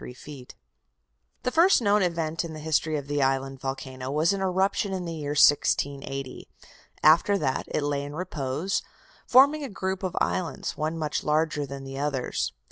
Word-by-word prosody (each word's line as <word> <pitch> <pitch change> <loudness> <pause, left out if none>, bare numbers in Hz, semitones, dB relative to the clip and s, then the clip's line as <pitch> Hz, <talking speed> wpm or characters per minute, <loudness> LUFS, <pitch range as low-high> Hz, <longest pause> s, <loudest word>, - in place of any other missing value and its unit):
The 250 - 0
first 345 +6 +5
known 210 -2 +3
event 165 -3 -1
in 165 -2 -6
the 155 - -7
history 155 0 0
of 145 - -5
the 145 0 -1
island 135 0 0
volcano 130 -1 -5
was 155 +6 +2
an 195 - -3
eruption 190 +1 0
in 185 -2 -3
the 165 - -4
year 145 -2 -4
1680. 135 -2 +2 0.6
After 170 +6 +5
that 135 -7 -1
it 150 - -2
lay 145 -1 -1
in 145 +1 -7
repose, 155 0 -2 0.5
forming 280 +4 +5
a 275 - -4
group 190 -1 -3
of 185 -2 -4
islands, 165 -7 -2
one 155 +2 -2
much 155 -2 -2
larger 150 -1 0
than 135 0 -7
the 135 0 -7
others. 140 -3 -1
155 Hz, 165 wpm, -26 LUFS, 140-185 Hz, 0.6 s, first